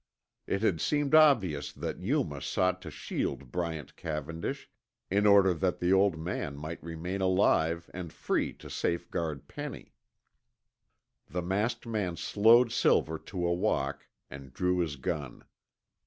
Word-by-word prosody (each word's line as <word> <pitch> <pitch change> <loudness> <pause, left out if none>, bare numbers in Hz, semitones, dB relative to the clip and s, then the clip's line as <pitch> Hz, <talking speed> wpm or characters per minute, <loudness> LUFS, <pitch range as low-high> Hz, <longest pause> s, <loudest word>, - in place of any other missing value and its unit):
It 100 +2 -1
had 85 -8 +2
seemed 145 -1 0
obvious 115 - +5
that - - -5
Yuma 100 - -1
sought 90 0 0
to - - -7
shield 65 -3 -4
Bryant 85 -4 -4
Cavendish, 80 +1 -4 0.4
in 100 +2 +3
order 100 -2 +6
that 90 +2 0
the 90 +2 +2
old 95 -3 +4
man 80 -3 -4
might 80 +3 -6
remain 85 +4 -4
alive 85 -3 +2
and 90 -3 -6
free - - -1
to - - -13
safeguard 80 -4 -2
Penny. - - -7 1.3
The 90 -1 -3
masked 105 +7 -1
man 105 -7 -2
slowed 115 +6 +5
Silver 80 -8 +2
to 90 -3 -4
a 85 - +2
walk, 70 -5 -1 0.2
and 70 -1 -10
drew 90 +5 0
his 80 -5 -1
gun. 70 -2 -4
90 Hz, 140 wpm, -30 LUFS, 80-100 Hz, 1.3 s, order